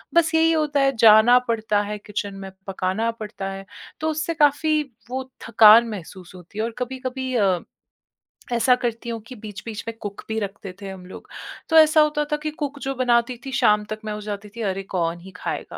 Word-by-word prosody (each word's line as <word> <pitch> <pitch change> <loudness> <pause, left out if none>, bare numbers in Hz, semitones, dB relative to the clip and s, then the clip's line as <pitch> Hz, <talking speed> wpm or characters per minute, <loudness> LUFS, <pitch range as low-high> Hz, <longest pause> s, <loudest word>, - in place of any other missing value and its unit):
बस 330 -1 +4
यही 325 0 +4
होता 300 -3 +1
है 275 -1 +2
जाना 220 +2 +7
पड़ता 220 -2 +1
है 210 +1 -4
किचन 205 -1 -4
में, 195 0 -8 0.2
पकाना 195 +4 -1
पड़ता 210 -3 -6
है, 195 0 -8 0.3
तो 315 - -1
उससे 315 +2 -2
काफ़ी 305 0 +3 0.3
वो 260 +1 -2 0.3
थकान 230 +1 +7
महसूस 185 -2 -9
होती 180 +3 -14
है - - +1
और 235 - -4
कभी-कभी 260 +1 -4
अ, 195 -6 +2 0.9
ऐसा 235 +2 +4
करती 235 -1 -4
हूँ 230 -1 -3
कि 255 - -9
बीच-बीच 215 0 -8
में 230 - -4
कुक 205 -2 -7
भी 220 - -2
रखते 200 -2 -6
थे 200 - -6
हम 190 -1 -9
लोग। 185 - -11 0.4
तो 320 - +1
ऐसा 310 0 +7
होता 300 0 +2
था 300 - +1
कि 305 - -2
कुक 290 -2 -5
जो 270 0 -3
बनाती 245 -1 +1
थी, 270 - -5
शाम 210 -4 +3
तक 215 - -4
में 215 - -3
हो 210 - -6
जाती 210 0 -6
थी, 235 - -6
अरे 195 -2 -2
कौन 170 -1 -1
ही 190 +2 -12
खाएगा - - -5
230 Hz, 205 wpm, -23 LUFS, 205-270 Hz, 0.9 s, जाना